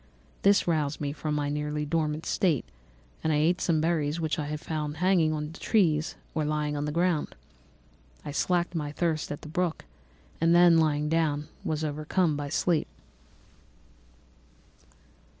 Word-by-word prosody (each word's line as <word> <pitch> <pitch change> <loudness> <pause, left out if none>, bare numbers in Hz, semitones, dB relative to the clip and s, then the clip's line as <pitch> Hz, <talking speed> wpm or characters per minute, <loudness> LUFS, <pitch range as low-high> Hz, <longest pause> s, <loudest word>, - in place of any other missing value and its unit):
This 200 -1 +4
roused 155 -3 0
me 145 -1 -2
from 150 0 -3
my 145 -1 0
nearly 150 +1 -2
dormant 155 0 -1
state, 165 -9 +1 0.6
and 160 - +1
I - - +2
ate 160 +4 +2
some 165 -3 +2
berries 160 -1 0
which 160 0 -1
I 150 0 -3
found 150 -1 -4
hanging 180 -2 +3
on 150 0 -3
the 165 - -12
trees 165 -8 +2 0.2
or 155 - 0
lying 150 0 -1
on 145 0 -2
the 150 - -2
ground. 170 -1 0 0.9
I - - -4
slaked 175 +4 0
my 150 -3 -3
thirst 155 -1 -1
at 145 - -5
the - - -8
brook, 170 +1 -2 0.6
and 165 +1 +4
then 175 -1 +7
lying 150 -1 +1
down, 150 -2 0
was 155 0 -2
overcome 155 +2 0
by 145 0 -4
sleep. 165 +2 +1
155 Hz, 155 wpm, -28 LUFS, 150-165 Hz, 0.9 s, then